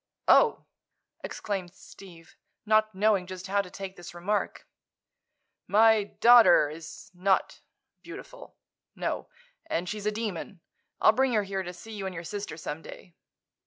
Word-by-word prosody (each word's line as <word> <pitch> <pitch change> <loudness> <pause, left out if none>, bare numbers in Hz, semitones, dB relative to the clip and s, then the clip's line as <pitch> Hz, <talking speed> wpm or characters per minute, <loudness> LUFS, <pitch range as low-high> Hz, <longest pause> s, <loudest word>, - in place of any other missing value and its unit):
"Oh!" 470 - +5 0.6
exclaimed 190 -3 -5
Steve, 170 -4 -15 0.3
not 215 -1 +2
knowing 200 -2 +2
just 185 -1 -8
how 200 +1 +1
to 190 - -11
take 195 0 -8
this 175 0 -10
remark. 200 +4 -2 1.0
"My 220 0 +5 0.2
daughter 235 -11 +7
is 155 0 -11
not—beautiful. 195 - -4 0.4
No. - - -3 0.4
And 180 - -2
she's 210 +2 -4
a - - +2
demon. 205 -4 -5 0.4
I'll - - +6
bring 260 +2 +1
her 210 -2 +2
here 195 -1 -3
to 180 -1 -6
see 180 +5 -12
you 200 -2 -4
and 185 - -6
your 165 - -6
sister, 205 -1 -6
some 155 0 -6
day." 175 - -12
195 Hz, 140 wpm, -28 LUFS, 180-215 Hz, 1.0 s, daughter